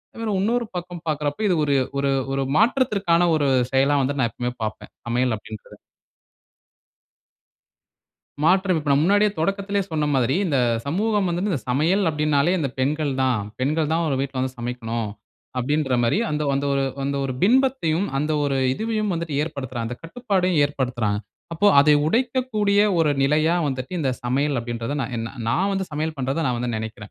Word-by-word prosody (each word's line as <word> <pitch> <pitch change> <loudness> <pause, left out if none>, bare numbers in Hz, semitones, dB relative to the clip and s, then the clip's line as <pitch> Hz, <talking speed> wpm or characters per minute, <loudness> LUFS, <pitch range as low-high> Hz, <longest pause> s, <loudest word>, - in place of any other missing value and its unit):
இதோட 225 -1 -3
இன்னொரு 235 +4 +1
பக்கம் 175 -1 -6
பாக்குறப்போ, 150 +3 -2
இது 185 - +2
ஒரு 145 -1 +1 0.2
ஒரு 140 0 +1 0.2
ஒரு 135 0 0
மாற்றத்திற்கான 205 -7 +2
ஒரு 145 -2 +1 0.3
செயலா 140 +2 +3
வந்து 140 +2 -1
நான் 120 -3 +2
எப்பவுமே 120 +3 -4
பாப்பேன், 110 0 -5 0.2
சமையல் 120 0 +1
அப்படின்றத. 110 0 -11 2.7
மாற்றம் 185 +1 +3
இப்ப 150 -1 -5
நான் 140 +1 +4
முன்னாடியே 205 +3 +4
தொடக்கத்துலயே 195 +4 0
சொன்ன 155 -1 0
மாதிரி, 130 0 +2
இந்த 145 -6 +1 0.3
சமூகம் 205 +6 +1
வந்துட்டு 175 +4 -1
இந்த 145 - -1
சமையல் 165 +10 +2
அப்படின்னாலே 150 +1 +1
இந்த 145 -5 -1
பெண்கள்தான். 135 -4 0 0.2
பெண்கள்தான் 155 +4 +1
ஒரு 140 - 0
வீட்ல 135 -1 -3
வந்து 130 0 -3
சமைக்கணும். 115 -2 -3 0.5
அப்படின்ற 140 +1 0
மாரி 120 +11 +2
அந்த 150 0 -1
அந்த 140 +1 0
ஒரு 140 0 +1 0.2
அந்த 140 +1 -1
ஒரு 135 - -2
பிம்பத்தையும், 220 -6 +2
அந்த 150 +2 0
ஒரு 140 -1 0 0.2
இதுவையும் 215 +5 -1
வந்துட்டு 165 -3 -4
ஏற்படுத்துற 140 -6 -5
அந்த 120 +2 -4
கட்டுப்பாட்டையும் 185 -3 0
ஏற்படுத்துறாங்க. 125 -7 -1 0.3
அப்போ 165 +5 +1
அதை 150 +1 +5
உடைக்கக்கூடிய 230 -1 +1 0.2
ஒரு 160 -2 +3
நிலையா 155 +4 +3
வந்துட்டு, 130 +1 -4
இந்த 135 -4 +1
சமையல் 140 +3 0
அப்படின்றத 120 +1 -4
நான் 135 - -4
என் 115 0 -3 0.2
நான் 185 +12 +1
வந்து 190 -1 -1
சமையல் 155 +1 -2
பண்றதா 135 +5 -1
நான் 125 -1 0
வந்து 120 0 -2
நினைக்கிறேன். 110 -1 -7
150 Hz, 155 wpm, -23 LUFS, 130-185 Hz, 2.7 s, அதை